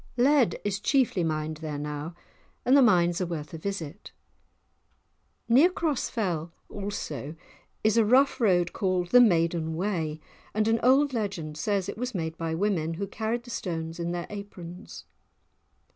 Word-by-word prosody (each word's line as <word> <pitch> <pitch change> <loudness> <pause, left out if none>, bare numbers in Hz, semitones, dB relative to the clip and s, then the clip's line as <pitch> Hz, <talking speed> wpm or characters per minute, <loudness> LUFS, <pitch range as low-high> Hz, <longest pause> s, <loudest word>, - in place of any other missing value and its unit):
Lead 265 0 +3
is 200 -1 -1
chiefly 245 - +2
mined 155 -1 -2
there 155 -2 -5
now, 150 +3 -5 0.5
and 255 - +5
the 280 - +7
mines 175 -7 +4
are 180 - -1
worth 155 -3 -5
a 165 - -6
visit. 190 -1 -5 1.4
Near 270 +9 +6
Cross 320 -7 -1
Fell 175 -8 -2 0.2
also 160 - -5 0.5
is 220 +1 +3
a 230 - +6
rough 260 +5 +3
road 175 -5 +3
called 185 -2 0
the 245 - +8
"Maiden 165 -6 +2
Way," 165 -4 -2 0.4
and 215 0 +2
an 225 0 +2
old 270 +3 +4
legend 195 -9 -3
says 200 -3 0
it - - -6
was 250 -2 -3
made 160 -2 -3
by 165 -1 -3
women, 165 -4 0
who 200 +4 -3
carried 220 +4 -3
the 240 - -10
stones 165 -4 -4
in 170 0 -2
their 175 0 -3
aprons! 195 -2 -9
185 Hz, 160 wpm, -27 LUFS, 165-225 Hz, 1.4 s, the